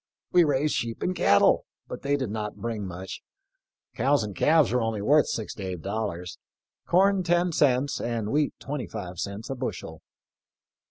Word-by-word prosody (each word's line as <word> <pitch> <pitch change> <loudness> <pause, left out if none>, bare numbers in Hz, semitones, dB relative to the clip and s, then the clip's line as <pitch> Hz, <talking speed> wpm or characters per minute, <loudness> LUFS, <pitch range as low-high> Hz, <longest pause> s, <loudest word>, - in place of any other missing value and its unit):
We 180 -1 +6
raised 145 0 +1
sheep 115 -1 -3
and 185 - 0
cattle, 100 - +4 0.2
but - - -7
they 140 0 +1
did 130 -7 -3
not 105 -1 -4
bring 110 -4 -4
much. 90 +1 -7 0.7
Cows 135 +1 +2
and 105 -2 -6
calves 155 -5 +4
were 125 0 +2
only 115 -2 -1
worth 145 +8 +4
six 110 - -3
to 100 - -8
eight 90 -3 -5
dollars; 100 -4 -4 0.5
corn 195 +2 +4
ten 175 0 +2
cents, 140 -2 +2
and 115 -3 -2
wheat 150 0 +1
twenty 145 -2 -4
five 90 -5 -7
cents, 100 +5 -5
a - - -2
bushel." 90 - -5
115 Hz, 170 wpm, -26 LUFS, 100-145 Hz, 0.7 s, We